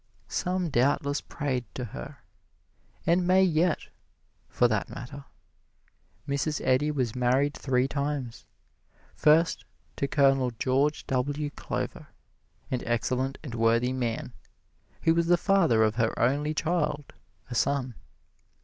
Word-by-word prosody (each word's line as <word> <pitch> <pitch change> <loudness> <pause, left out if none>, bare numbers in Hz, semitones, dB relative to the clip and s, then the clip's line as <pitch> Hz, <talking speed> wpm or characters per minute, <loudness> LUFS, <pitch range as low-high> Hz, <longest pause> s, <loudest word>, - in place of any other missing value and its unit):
Some 180 -2 -1
doubtless 140 +3 +1
prayed 130 -4 -3
to 125 - -3
her - - -9 0.8
and 175 +1 +2
may 190 +1 +5
yet, 170 -1 +1 0.6
for 120 - +3
that 110 -3 -1
matter. 135 +3 -8 1.0
Mrs. 140 +2 -1
Eddy 130 +3 +3
was 130 -7 -1
married 130 +3 +2
three 130 -2 0
times. 140 -4 -3 0.7
First, 155 +3 +3 0.3
to 140 - 0
Colonel 135 -2 +3
George 135 +5 +1
W. 145 +3 -1
Glover, - - -4 0.6
an 125 -1 -1
excellent 125 +3 -1
and 135 -6 -7
worthy 115 +2 +2
man, 120 -1 -3 0.7
who 165 - +4
was 170 0 +1
the 175 0 +5
father 170 - +3
of 110 +1 +1
her 115 -2 +1
only 145 +5 +1
child, 155 -3 -1 0.4
a - - -2
son. 130 +1 0
140 Hz, 120 wpm, -27 LUFS, 125-150 Hz, 1.0 s, may